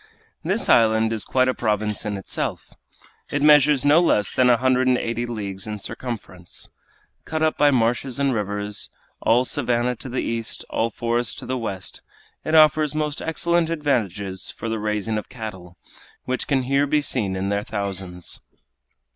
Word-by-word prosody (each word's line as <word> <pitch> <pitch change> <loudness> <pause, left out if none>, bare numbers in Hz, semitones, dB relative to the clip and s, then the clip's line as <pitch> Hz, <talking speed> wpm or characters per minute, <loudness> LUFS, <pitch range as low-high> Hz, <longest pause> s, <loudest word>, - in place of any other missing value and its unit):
This - - 0
island 110 -1 +4
is 110 - -1
quite 130 0 +2
a 130 - +2
province 105 -1 -1
in 105 -1 -2
itself. 95 - -4 0.6
It 145 0 -1
measures 150 -2 +6
no 150 +4 +6
less 105 - +2
than 125 -1 +3
a 120 - +5
hundred 130 +1 +2
and 125 -1 +4
eighty 120 0 -2
leagues 100 -4 -4
in 105 0 -4
circumference. 100 -5 -6 0.5
Cut 160 0 -2
up 155 - +2
by 145 - +4
marshes 125 0 +1
and 140 -1 +1
rivers, 105 -1 -2 0.3
all 120 +3 +3
savannah 125 -2 0
to 130 - -8
the 125 - -2
east, 115 0 -3
all 115 - +1
forest 120 +1 -1
to - - -8
the 130 - -2
west, 100 -6 -4 0.4
it 155 - 0
offers 155 -1 +5
most 150 -1 -2
excellent 170 +1 +1
advantages 105 - -1
for 115 - -6
the 110 -1 -2
raising 105 +1 -1
of - - -10
cattle, 95 -7 -8 0.5
which 130 0 -2
can 135 -3 +1
here 140 +3 +2
be 150 +1 +2
seen 105 -9 0
in 95 +1 -2
their 100 0 0
thousands. 95 -4 -4
120 Hz, 170 wpm, -23 LUFS, 105-140 Hz, 0.6 s, measures